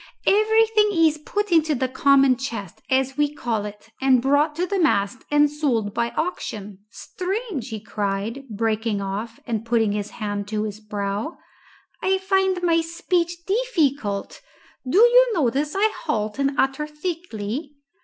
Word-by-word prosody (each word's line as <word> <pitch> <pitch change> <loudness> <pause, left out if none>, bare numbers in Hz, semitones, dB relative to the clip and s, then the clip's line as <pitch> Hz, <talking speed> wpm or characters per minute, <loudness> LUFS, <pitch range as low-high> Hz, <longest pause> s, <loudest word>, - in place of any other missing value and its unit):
"Everything 430 +1 +4
is 320 -3 +3
put 410 +6 -3
into 315 -2 +3
the 260 0 0
common 275 0 +4
chest, 230 -8 -6
as 265 +1 +1
we 295 -1 +2
call 230 -7 -2
it, 210 +2 -10
and 265 -1 +5
brought 285 +4 +2
to 350 +3 0
the 395 +1 -1
mast 225 - +2
and 295 0 +5
sold 265 -9 -1
by 235 +1 0
auction 210 - -4
Strange!" 370 - -4
he 220 -2 -5
cried, 210 +4 -3
breaking 220 0 -1
off 200 +4 -4
and 225 -2 -2
putting 225 -2 +1
his 205 0 -3
hand 205 -2 -3
to 215 0 -2
his 210 -1 -5
brow. 210 - -4 0.6
"I 380 0 +2
find 380 -1 +1
my 335 -1 +3
speech 345 +1 -2
difficult. 295 - -1 0.5
Do 340 - +2
you 485 +1 +6
notice 290 +1 0
I 430 +2 +3
halt 215 +3 -2
and 275 -1 0
utter 270 +3 +1
thickly?" 300 - -5
275 Hz, 150 wpm, -23 LUFS, 215-345 Hz, 0.6 s, you